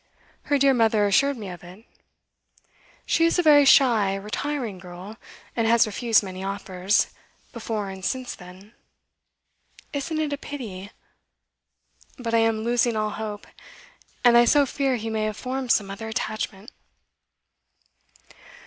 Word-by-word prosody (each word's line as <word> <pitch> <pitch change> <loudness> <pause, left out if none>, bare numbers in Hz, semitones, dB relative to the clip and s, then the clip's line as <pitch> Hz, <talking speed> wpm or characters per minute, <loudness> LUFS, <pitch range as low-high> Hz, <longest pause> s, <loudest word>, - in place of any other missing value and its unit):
Her 290 - +2
dear 275 0 +4
mother 225 -3 +3
assured 275 +7 +2
me 210 -3 -7
of 175 -1 -10
it. 185 +6 -14 1.2
She 330 - +2
is 335 +2 +3
a 355 - +2
very 290 -2 +6
shy, 230 -8 +5
retiring 215 +1 -4
girl, 180 +4 -10 0.4
and 230 -1 +1
has 230 +1 +5
refused 225 +1 +2
many 185 -1 -7
offers, 195 0 0 0.4
before 220 -4 -4
and 190 0 -10
since 255 +4 -3
then. 185 +3 -14 1.2
Isn't 305 +3 -3
it 300 -2 -1
a 285 - -4
pity? 205 -11 -7 1.3
But 230 -2 -4
I 230 - +4
am 225 -1 +1
losing 240 0 +1
all 215 0 -1
hope, 210 -1 -6 0.8
and 240 -1 +6
I 240 0 +7
so 285 +3 +4
fear 270 0 -1
he 225 -1 -4
may 215 -1 -1
have 215 -1 -3
formed 260 -1 -3
some 195 -2 +1
other 220 +3 -7
attachment. 215 -1 -4
225 Hz, 140 wpm, -24 LUFS, 200-260 Hz, 1.3 s, I